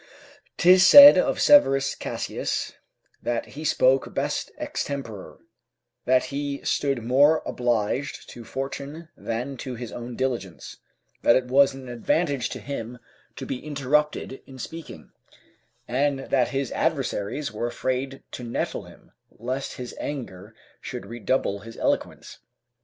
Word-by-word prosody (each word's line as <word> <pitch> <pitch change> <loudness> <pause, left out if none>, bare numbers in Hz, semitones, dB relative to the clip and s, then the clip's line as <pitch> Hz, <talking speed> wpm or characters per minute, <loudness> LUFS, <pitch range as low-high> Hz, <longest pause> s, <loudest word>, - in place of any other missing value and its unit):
'Tis 180 +1 +6
said 285 +8 +11
of - - +1
Severus 135 - +5
Cassius - - -4 0.5
that 120 -1 -2
he 150 +3 -8
spoke 135 -3 +2
best - - -2
extempore, 115 -9 -5 0.7
that 130 0 +3
he 140 0 -3
stood 135 -5 0
more 145 +6 +4
obliged 120 +3 -1
to 120 - -10
fortune 140 +6 -6
than 125 +4 -4
to 125 0 -6
his 120 -1 -7
own 120 0 -7
diligence; 115 -9 -4 0.4
that 120 - +5
it 130 - +1
was 135 +2 +4
an 135 -1 -10
advantage 125 +2 0
to - - -6
him 125 -3 -6 0.4
to - - -7
be 125 - -5
interrupted 150 -1 -1
in 130 - -12
speaking, 130 - -9 0.8
and 140 +3 +1
that 130 -3 +3
his 135 -2 -3
adversaries 105 +9 -2
were 110 +2 -3
afraid 130 +2 -3
to 125 - -7
nettle 120 0 -3
him, - - -17 0.2
lest 130 +4 -5
his 125 -1 -7
anger 110 -7 -6 0.3
should 125 -1 -7
redouble 120 -3 -1
his 115 +3 -12
eloquence. - - -2
130 Hz, 130 wpm, -25 LUFS, 120-140 Hz, 0.8 s, said